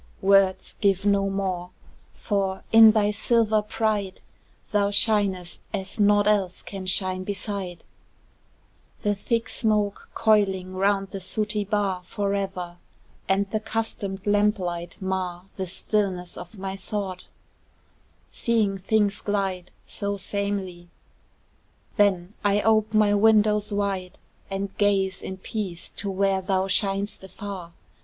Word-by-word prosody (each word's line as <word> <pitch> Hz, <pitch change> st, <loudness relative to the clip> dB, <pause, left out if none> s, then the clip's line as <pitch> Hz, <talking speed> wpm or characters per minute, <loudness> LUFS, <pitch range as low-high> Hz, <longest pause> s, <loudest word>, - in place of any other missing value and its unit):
Words 190 Hz, -1 st, +3 dB
give 195 Hz, -1 st, +2 dB
no 200 Hz, -1 st, +3 dB
more 190 Hz, -2 st, -2 dB, 0.5 s
for, 195 Hz, -2 st, -1 dB
in 225 Hz, 0 st, +10 dB
thy 210 Hz, -1 st, +3 dB
silver 220 Hz, 0 st, +2 dB
pride, 210 Hz, -2 st, -1 dB, 0.5 s
Thou 205 Hz, -1 st, +2 dB
shinest 200 Hz, -4 st, +1 dB
as 195 Hz, +2 st, -5 dB
naught 205 Hz, 0 st, +5 dB
else 200 Hz, -4 st, +1 dB
can 190 Hz, -2 st, -7 dB
shine 185 Hz, 0 st, 0 dB
beside: 195 Hz, -3 st, -4 dB, 1.2 s
The 205 Hz, -, +2 dB
thick 230 Hz, +3 st, -1 dB
smoke, 210 Hz, -4 st, 0 dB
coiling 195 Hz, -4 st, +2 dB
round 195 Hz, +1 st, +1 dB
the 195 Hz, -, -5 dB
sooty 210 Hz, +2 st, -1 dB
bar 200 Hz, -3 st, 0 dB
Forever, 195 Hz, -2 st, -3 dB, 0.5 s
and 195 Hz, +1 st, +2 dB
the 215 Hz, -, 0 dB
customed 210 Hz, -3 st, -3 dB
lamp 205 Hz, +1 st, +3 dB
light 175 Hz, -1 st, -5 dB
mar 185 Hz, -2 st, -3 dB
The 190 Hz, -1 st, -3 dB
stillness 185 Hz, -1 st, -2 dB
of 180 Hz, +4 st, -10 dB
my 190 Hz, 0 st, -4 dB
thought 195 Hz, -2 st, -5 dB, 1.1 s
seeing 215 Hz, -4 st, +1 dB
things 205 Hz, +1 st, +1 dB
glide 195 Hz, -3 st, -2 dB, 0.2 s
So 200 Hz, 0 st, -3 dB
samely: 195 Hz, -3 st, -3 dB, 1.1 s
then 195 Hz, -2 st, +2 dB
I 205 Hz, 0 st, +3 dB
ope 220 Hz, -1 st, +3 dB
my 210 Hz, -1 st, +5 dB
windows 210 Hz, 0 st, +4 dB
wide, 195 Hz, -3 st, -2 dB, 0.3 s
And 195 Hz, 0 st, -4 dB
gaze 195 Hz, -2 st, +2 dB
in 190 Hz, -, -6 dB
peace 190 Hz, -3 st, -5 dB
to 200 Hz, -, -3 dB
where 195 Hz, 0 st, +1 dB
thou 190 Hz, 0 st, +1 dB
shin'st 195 Hz, +1 st, 0 dB
afar. 190 Hz, -2 st, -7 dB
200 Hz, 120 wpm, -25 LUFS, 190-210 Hz, 1.2 s, in